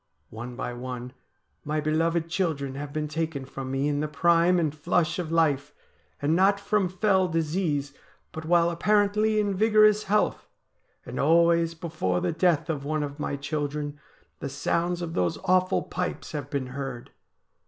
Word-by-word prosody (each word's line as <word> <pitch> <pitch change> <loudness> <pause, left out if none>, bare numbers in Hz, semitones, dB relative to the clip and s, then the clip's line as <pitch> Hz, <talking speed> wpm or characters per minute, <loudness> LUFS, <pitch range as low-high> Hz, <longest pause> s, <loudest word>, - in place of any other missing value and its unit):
One 120 +3 -7
by 120 - -4
one 125 0 -6 0.5
my 155 +1 -1
beloved 165 +2 +1
children 160 -7 -1
have 145 +1 -6
been 155 0 -2
taken 155 -2 -3
from 135 0 -7
me 135 +2 0
in 145 -1 0
the 150 - -1
prime 170 +4 +3
and 160 -4 +1
flush 165 +2 0
of 165 -3 -3
life, 150 -3 +1 0.4
and 150 +3 +1
not 195 +2 +4
from 200 -2 +1
fell 190 0 +2
disease, 160 -3 -1 0.4
but 155 - -7
while 170 +1 +3
apparently 210 +4 +2
in 205 -1 +1
vigorous 215 +1 +4
health; 210 +2 +1 0.6
and - - -6
always 170 +2 +3
before 155 - -2
the - - 0
death 165 -2 +2
of 150 -4 -3
one 155 +1 -1
of 145 +1 -6
my 145 - -2
children 145 0 -3 0.4
the 140 - -4
sounds 170 +5 -1
of 165 -1 -4
those 90 - 0
awful 185 0 +2
pipes 180 +1 -4
have 145 -3 -5
been 140 -2 -2
heard.' 135 -3 -6
160 Hz, 165 wpm, -26 LUFS, 145-175 Hz, 0.6 s, not